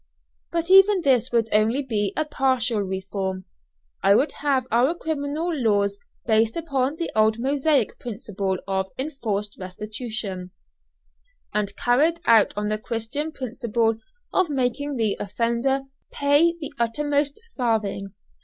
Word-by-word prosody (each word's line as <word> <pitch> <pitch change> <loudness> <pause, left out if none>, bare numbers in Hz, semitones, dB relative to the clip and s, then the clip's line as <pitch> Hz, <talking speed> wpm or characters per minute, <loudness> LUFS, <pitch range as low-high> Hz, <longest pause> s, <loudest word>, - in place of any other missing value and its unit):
But 335 +1 -1
even 390 0 +7
this 255 -5 +2
would 230 -2 +2
only 220 +6 +2
be 210 -6 -1
a 310 - +1
partial 260 -6 +1
reform. 190 -1 -3 0.6
I 200 - +5
would 280 +8 +2
have 275 -3 +1
our 250 +8 +3
criminal 315 +1 -2
laws 205 -7 +1 0.3
based 220 +2 +2
upon 280 -4 -1
the 335 +1 -3
old 220 0 +3
Mosaic 275 0 +1
principle 200 -4 -3
of 190 -1 -1
"enforced 215 -8 -3
restitution," 205 0 -5 1.0
and 210 -1 -1
carried 300 +8 +2
out 225 -3 +5
on 210 0 -1
the 215 0 -1
Christian 235 +7 -3
principle 235 -4 -1 0.3
of 370 -3 +2
making 280 +1 -1
the 220 -4 0
offender 235 +6 0 0.3
"pay 290 +4 +3
the 295 - -6
uttermost 285 - 0 0.2
farthing." 210 -5 -1
235 Hz, 125 wpm, -24 LUFS, 210-285 Hz, 1.0 s, even